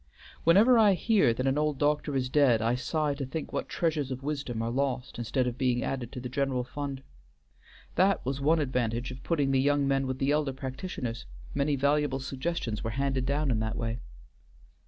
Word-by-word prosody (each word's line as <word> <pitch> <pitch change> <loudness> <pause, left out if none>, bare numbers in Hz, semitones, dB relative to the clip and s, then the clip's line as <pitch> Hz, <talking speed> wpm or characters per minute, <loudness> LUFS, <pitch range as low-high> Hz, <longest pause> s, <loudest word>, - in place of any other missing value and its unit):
Whenever 215 +9 +6
I 210 -3 +6
hear 190 - +3
that 130 +3 -2
an 135 +2 +2
old 150 -2 0
doctor 145 0 +1
is 130 -1 0
dead 130 -4 +4
I 115 +2 +1
sigh 150 +3 0
to 140 0 -4
think 135 +4 -5
what - - -3
treasures 155 -5 0
of 130 0 -5
wisdom 140 -6 -3
are 115 - -2
lost 130 -1 -2
instead 120 +2 0
of 125 +1 -3
being 125 -2 +1
added 125 -3 -3
to 130 - -6
the 125 - -5
general 130 0 -1
fund. 140 +1 -5 0.9
That 190 -2 +2
was 135 +2 -2
one 155 +4 +4
advantage 125 -4 -1
of 125 +1 -9
putting 145 -5 0
the 135 -1 +3
young 145 0 +2
men 135 -1 +1
with 130 0 -2
the 135 +2 +1
elder 150 -2 +1
practitioners; 130 - -5 0.3
many 140 +1 +1
valuable 140 0 +1
suggestions 130 -3 -3
were 115 - -2
handed 135 +1 -1
down 145 0 +1
in 110 - +1
that 110 0 -2
way." 115 0 -2
135 Hz, 200 wpm, -29 LUFS, 125-150 Hz, 0.9 s, Whenever